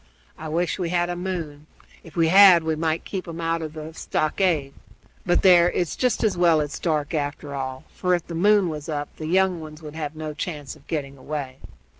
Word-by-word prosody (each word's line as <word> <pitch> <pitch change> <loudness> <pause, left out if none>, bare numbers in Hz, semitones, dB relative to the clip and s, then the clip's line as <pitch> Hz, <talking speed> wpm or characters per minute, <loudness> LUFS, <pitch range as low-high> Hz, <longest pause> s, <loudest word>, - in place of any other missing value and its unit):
I 160 - -8
wish 170 +4 -1
we 175 -2 -1
had 175 0 0
a - - -3
moon; 165 -5 -5 0.4
if 165 - -14
we 165 -2 +3
had, 185 -2 +8
we 160 0 0
might 160 +1 -1
keep 190 -3 -5
'em 165 0 -7
out 165 0 -1
of 155 -1 -5
the 155 0 -8
stockade. 155 -3 0 0.5
But 175 - +2
there 175 -2 +7
it's 175 -3 -2
just 250 -3 0
as 220 - +2
well 170 -3 +4
it's 145 -1 -3
dark, 155 -3 -1
after 145 -1 -3
all; 130 0 -4
for, 180 -1 +1
if 175 - -4
the 170 - -8
moon 200 +3 +4
was 155 -1 -5
up, 145 -1 -4
the 155 - -5
young 185 0 +2
ones 155 0 -10
would 150 -1 -8
have 155 -1 -5
no 155 -1 -5
chance 150 -2 -5
of - - -21
getting 140 -4 -4
away." 140 -2 -5
160 Hz, 215 wpm, -24 LUFS, 150-175 Hz, 0.5 s, had